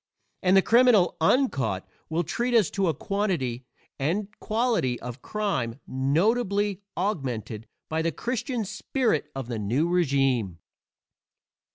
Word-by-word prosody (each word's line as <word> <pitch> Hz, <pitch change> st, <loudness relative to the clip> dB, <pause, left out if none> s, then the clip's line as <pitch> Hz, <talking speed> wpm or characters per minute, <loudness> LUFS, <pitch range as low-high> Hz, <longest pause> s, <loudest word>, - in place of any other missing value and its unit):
And 185 Hz, +1 st, +4 dB
the 190 Hz, -, +5 dB
criminal 235 Hz, -6 st, +5 dB
uncaught 135 Hz, -, +1 dB, 0.2 s
will 165 Hz, +2 st, 0 dB
treat 240 Hz, +9 st, -1 dB
us 215 Hz, -7 st, +4 dB
to 195 Hz, -2 st, 0 dB
a 165 Hz, -, +2 dB
quantity 145 Hz, -, -2 dB, 0.3 s
and 185 Hz, +9 st, -1 dB
quality 220 Hz, -, 0 dB
of 125 Hz, +1 st, -7 dB
crime 145 Hz, -, -2 dB
notably 200 Hz, -, +1 dB, 0.2 s
augmented 125 Hz, -, -3 dB, 0.2 s
by 160 Hz, 0 st, -1 dB
the 165 Hz, +1 st, 0 dB
Christian 240 Hz, -, -2 dB
spirit 215 Hz, -, 0 dB
of 135 Hz, -3 st, -4 dB
the 120 Hz, -3 st, -3 dB
new 120 Hz, +11 st, +1 dB
régime. 135 Hz, -, +1 dB
170 Hz, 125 wpm, -26 LUFS, 130-210 Hz, 0.3 s, the